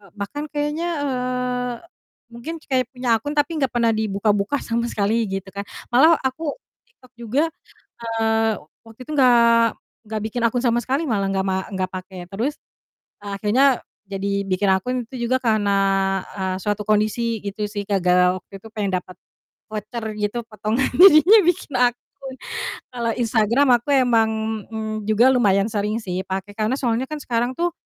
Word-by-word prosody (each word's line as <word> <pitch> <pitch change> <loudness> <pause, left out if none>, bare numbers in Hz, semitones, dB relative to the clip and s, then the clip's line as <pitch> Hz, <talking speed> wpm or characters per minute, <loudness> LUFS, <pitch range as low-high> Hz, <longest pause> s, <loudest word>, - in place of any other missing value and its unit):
bahkan 215 +9 -5
kayaknya 295 +3 -2 0.2
eee, 250 -2 -2 0.6
mungkin 235 +8 -6
kayak 255 -3 0
punya 250 -3 0
akun 290 +6 -5
tapi 300 +2 0
enggak 270 - +2
pernah 235 -1 +3
dibuka-buka 210 +3 0
sama 235 0 -1
sekali 220 +1 0
gitu 195 0 -5
kan. 200 +1 -6 0.2
Malah 310 +7 +6
aku 285 +3 -2 0.3
Tiktok 375 - -23
juga, 240 +6 0 0.6
eee, 225 -1 +1 0.3
waktu 225 +1 -17
itu - - -10
nggak, 255 -4 +5 0.7
nggak 215 -1 -2
bikin 235 +2 -3
akun 235 +1 +1
sama 240 0 +2
sekali 275 +6 -1
malah, 200 -6 0
nggak 190 0 -1
ma 190 0 0
nggak 190 -2 -2
pakai 185 -1 -7
terus 230 +11 -3 0.6
akhirnya 210 +7 +2 0.3
jadi 200 0 -1
bikin 195 0 0
akun 250 +6 -1
itu 240 0 -5
juga 260 - +3
karena, 215 -5 +1 0.6
eee, 190 -2 -2
suatu 210 0 0
kondisi 215 +1 0
gitu 205 +1 -3
sih, 205 -1 -5
gara-gara 180 -2 +3
waktu 195 - -12
itu 195 - -13
pengen 200 -4 -1
dapet 185 0 -9 0.5
voucher 215 +2 -6 0.2
gitu 210 +3 -2
potongan, 220 +3 -1
jadinya 365 +3 +8
bikin 335 -4 0
akun. 245 -1 +3 1.0
Kalau 235 -2 -1
Instagram 235 +3 +2
aku 280 +4 0
emang, 235 -4 +3 0.4
mmm, 215 -1 -5
juga 225 +4 +5
lumayan 200 -5 +3
sering 210 0 -1
sih 185 -1 -3
pakai 195 +1 -4
karena 220 +4 0
soalnya 250 -1 -1
kan 305 - -5
sekarang 240 +1 -1
tuh 345 +3 0
225 Hz, 155 wpm, -22 LUFS, 205-255 Hz, 1.0 s, jadinya